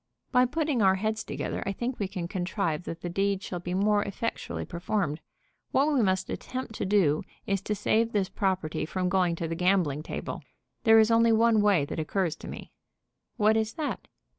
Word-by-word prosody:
"By 250 0 +4
putting 295 -3 0
our 190 -1 +5
heads 215 +2 -1
together - - -4
I 195 - -2
think 240 +5 -3
we 200 - 0
can 185 -3 -4
contrive 175 -2 -2
that 165 0 -6
the - - -4
deed 195 +2 0
shall 180 - -4
be 175 +1 -4
more 205 +2 +3
effectually 205 +3 -4
performed. 170 -3 -2 0.5
What 290 +3 +3
we 270 - +3
must 190 -3 +1
attempt 255 -3 -5
to - - -2
do 185 -7 +3 0.2
is 195 -1 0
to 210 +2 -2
save 225 +3 +1
this 200 -4 +1
property 185 -7 -1
from 180 +3 -1
going 180 -2 +2
to 165 0 -3
the 165 - -3
gambling 175 -4 +1
table. - - -5 0.4
There 225 0 +7
is 220 +1 +5
only 230 0 +5
one 225 -1 +4
way 200 -8 +3
that 145 - -5
occurs 170 +1 -1
to - - -10
me." - - -8 0.7
"What 215 +1 +4
is 220 0 0
that?" 310 -2 -4
195 Hz, 195 wpm, -28 LUFS, 180-220 Hz, 0.7 s, There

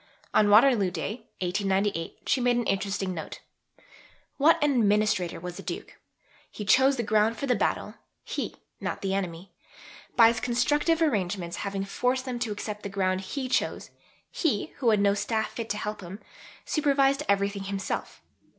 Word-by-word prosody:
On 210 -1 +4
Waterloo 215 -2 +6
Day, 210 +6 -5
1898, 195 -1 -1
she 265 - +1
made 245 0 +3
an 240 - +1
interesting 195 -1 -1
note: 160 -3 -7 1.0
What 310 +4 +5
an 295 - +3
administrator 210 -6 +2
was 180 +1 -7
the - - -6
Duke! - - -7 0.5
He 210 - -7
chose 265 +5 +5
the 235 - 0
ground 215 +1 +2
for - - -3
the 255 - +2
battle - - -1 0.3
he, - - -4 0.2
not - - -4
the 195 -1 0
enemy. 180 -1 -4 0.6
By 230 -2 +8
his 230 -1 -1
constructive 295 +8 +1
arrangements, 190 - -1
having 195 -1 -3
forced 250 +6 -1
them 250 -2 -4
to 235 -3 -2
accept 210 0 -5
the 200 - -5
ground 190 -1 0
he 260 +7 -4
chose, - - -1 0.4
he, 275 - -1
who 250 -4 +2
had 215 -2 +4
no 200 0 +4
staff 215 +1 -1
fit 225 0 -6
to 210 - -1
help 210 0 -4
him, 185 +3 -8 0.5
supervised 275 -2 +2
everything 200 0 +1
himself. 195 0 -4
210 Hz, 165 wpm, -27 LUFS, 195-245 Hz, 1.0 s, By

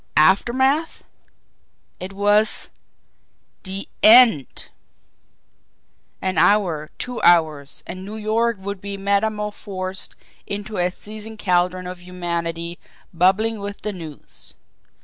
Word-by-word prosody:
Aftermath! 260 - +3 1.0
It 185 +1 -6
was 205 +2 +1 0.9
the 195 +1 -4
END! 220 - +6 1.5
An 185 0 0
hour, 175 -8 +2
two 250 -1 -5
hours, 155 -5 +2
and 185 +1 -7
New 205 +3 -7
York 220 +1 0
would 200 0 -5
be 200 0 -5
metamorphosed 200 -2 -2 0.3
into 205 +1 -5
a 175 0 +2
seething 215 +3 -9
caldron 180 -1 +1
of 180 0 -7
humanity 170 -1 -4 0.3
bubbling 195 +6 +2
with 200 0 -6
the 210 - -2
news. 160 -5 -10
195 Hz, 100 wpm, -21 LUFS, 180-215 Hz, 1.5 s, END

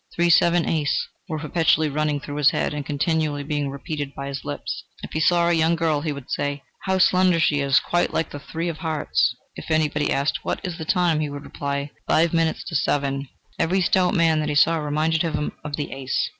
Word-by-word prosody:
"Three, 170 0 +3
seven, 170 +1 +4
ace," 150 -3 0 0.2
were 160 - -2
perpetually 160 0 +2
running 150 0 0
through 145 0 -7
his 145 -1 +5
head - - -1
and 150 -1 -3
continually 150 0 -1
being 145 -1 -2
repeated 140 0 -5
by 140 0 -5
his 135 -1 -5
lips. - - -5 0.2
If - - -7
he 155 - -1
saw 170 +1 +3
a 175 - +3
young 165 0 +3
girl, 160 -3 0
he 155 0 -2
would 140 -3 -8
say: 145 0 -2 0.2
"How 190 -1 +1
slender 185 -2 +4
she 150 -3 +2
is! 140 -1 +4
quite 175 0 0
like 160 - -1
the 145 - -6
three 165 +4 -4
of 165 -2 -4
hearts." 155 -6 0 0.2
If - - -9
anybody 155 -2 +1
asked: 140 +2 0
"What - - -2
is 180 -3 -5
the 160 - -4
time?" 175 -3 +2
he 150 -1 -1
would 145 0 -7
reply: 140 0 -4 0.2
"Five 165 +1 +3
minutes 165 -1 +1
to 165 - -5
seven." 140 -2 0 0.3
Every 185 +4 +2
stout 185 +1 +2
man 165 -3 +3
that 150 -1 -1
he 150 - -1
saw 165 +3 +4
reminded 155 +1 0
him 155 -3 -1
of 150 -1 -4
the 145 - -4
ace. 135 -1 -1
155 Hz, 220 wpm, -23 LUFS, 145-165 Hz, 0.3 s, his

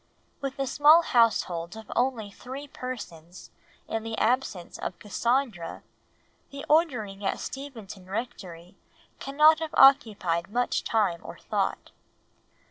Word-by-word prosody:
With 275 -1 -5
a 275 - -1
small 300 +5 +6
household 215 - +1
of 220 - -11
only 240 -5 0
three 265 +7 -9
persons, 185 - -8 0.4
in 225 - -2
the 225 0 -5
absence 220 -7 -1
of - - -5
Cassandra, 235 -3 -2 0.7
the 280 0 -8
ordering 245 - +1
at 195 - -1
Steventon 225 -9 -8
Rectory 190 -6 -6 0.4
cannot 305 +3 +4
have 320 -1 -5
occupied 210 - +4
much 245 +3 0
time 200 -7 0
or - - -9
thought. - - -2
230 Hz, 120 wpm, -27 LUFS, 195-270 Hz, 0.7 s, small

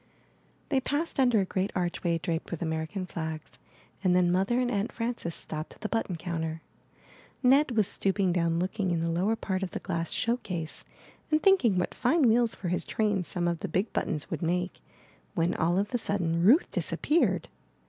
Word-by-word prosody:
They 270 -3 +2
passed 290 +3 -2
under 245 -5 +4
a - - 0
great 185 +1 -1
archway 175 -1 0
draped 165 0 -3
with 170 -1 -4
American 160 +4 -3
flags 160 -3 -6 0.4
and 180 -2 +4
then 180 -1 +4
Mother 195 +7 +2
and 250 -1 +1
Aunt 205 -1 -1
Frances 230 -8 -3
stopped 155 +1 -6
at - - -25
the 215 - -3
button 225 -5 -1
counter. 160 -2 -4 0.8
Ned 260 -1 +4
was 215 - +5
stooping 190 -1 +1
down 170 -1 +1
looking 185 +2 -1
in 170 -2 0
the 165 0 0
lower 190 +7 +1
part 190 -3 -2
of 190 - -2
the - - -5
glass 165 -1 -3
show 235 +1 +1
case, 170 -9 -5 0.5
and 310 0 +2
thinking 360 - +5
what 180 - 0
fine 265 +4 +3
wheels 230 0 +3
for 180 - -4
his 180 - 0
trains 205 -5 0
some 175 -1 -1
of 170 -1 -1
the - - -3
big 195 +5 -1
buttons 150 -2 -2
would - - -3
make, 180 +2 -1 0.5
when 170 0 +1
all 170 +3 +1
of 205 +5 -1
a 245 - +1
sudden 170 -6 0
Ruth 245 - +5
disappeared. 320 +3 +1
185 Hz, 190 wpm, -28 LUFS, 170-225 Hz, 0.8 s, was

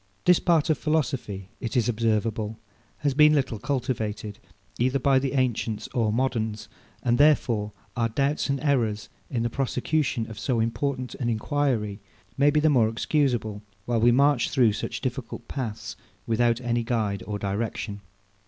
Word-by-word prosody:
This 180 -1 +6
part 165 -2 +3
of 155 - 0
philosophy, 130 - -1
it 125 +1 -2
is 120 -2 +2
observable, 110 -1 0 0.4
has 145 -2 +1
been 150 +2 +6
little 130 -6 0
cultivated, 110 -6 -3 0.4
either 130 +3 +2
by 135 0 +3
the 135 0 -2
ancients 120 -5 -1
or 115 -3 0
moderns; 110 -3 -1 0.4
and 120 0 +2
therefore 120 -8 +3 0.2
our 115 -2 +1
doubts 140 +5 0
and 140 0 0
errors, 120 -8 0 0.2
in 115 -3 -1
the 120 - 0
prosecution 135 -1 -1
of 110 -2 -9
so 120 -1 0
important 125 +3 -1
an 120 -3 -2
enquiry, 115 -3 0 0.4
may 140 +2 +4
be 150 +1 +3
the 155 - +3
more 125 -7 +4
excusable; 115 -4 0 0.2
while 120 -2 0
we 120 +1 +6
march 135 -1 +3
through 120 -5 +3
such - - -4
difficult 125 -2 -5
paths 120 -6 -5 0.3
without 115 +1 +2
any 120 -1 0
guide 110 -4 -1
or 105 -1 -2
direction. 100 0 -3
120 Hz, 155 wpm, -26 LUFS, 110-140 Hz, 0.4 s, This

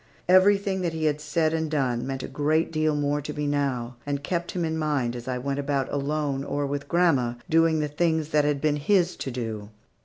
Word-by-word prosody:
Everything 190 +1 +4
that 170 -2 -1
he 160 -1 -3
had 150 -1 +1
said 155 +1 0
and 160 -1 -1
done 130 -5 0
meant 135 -1 -4
a - - -4
great 155 +2 0
deal 155 -1 +1
more 145 0 0
to 150 +1 -6
me 150 -1 -2
now, 130 -4 -1
and 140 +1 -3
kept 175 +2 -2
him 175 -2 -1
in 160 0 -2
mind, 145 -6 0
as 120 0 -8
I 130 -1 -1
went 140 +2 -2
about 140 -2 -1
alone, 145 -1 -1
or 145 0 -2
with 140 0 -4
grandma, 140 -8 +2
doing 165 -1 +3
the 150 - 0
things 160 0 0
that 150 -1 +3
had 145 -1 +1
been 150 0 +1
his 180 +3 +2
to - - -4
do. 110 -4 -5
145 Hz, 220 wpm, -26 LUFS, 140-160 Hz, -, Everything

